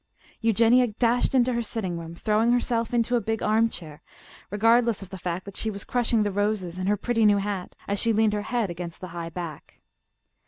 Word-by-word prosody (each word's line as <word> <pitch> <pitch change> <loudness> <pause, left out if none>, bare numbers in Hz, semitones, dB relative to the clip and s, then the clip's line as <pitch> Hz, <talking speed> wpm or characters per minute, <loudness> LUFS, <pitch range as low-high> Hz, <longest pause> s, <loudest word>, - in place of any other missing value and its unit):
Eugenia 230 +3 +4
dashed 240 +4 +1
into 250 0 +3
her 235 - 0
sitting 210 -6 -2
room, 165 0 -8
throwing 220 +5 +1
herself 235 -2 0
into 240 0 +1
a 235 - +2
big 225 +1 -2
armchair, 215 -9 0 0.5
regardless 225 +1 +2
of 195 - -13
the 190 - -6
fact 175 +1 -4
that 200 -1 -10
she 220 - -1
was 200 -1 -6
crushing 235 -2 +1
the 205 - -1
roses 200 -3 -1
in 185 - -2
her 205 +1 +2
pretty 230 +1 0
new 205 -1 +5
hat 200 -2 -4
as 200 0 0
she 230 - +4
leaned 220 -1 +2
her 210 - -1
head 220 -3 -1
against 170 -1 -7
the 185 - -8
high 170 0 -6
back. 165 -3 -8
210 Hz, 205 wpm, -25 LUFS, 185-230 Hz, 0.5 s, new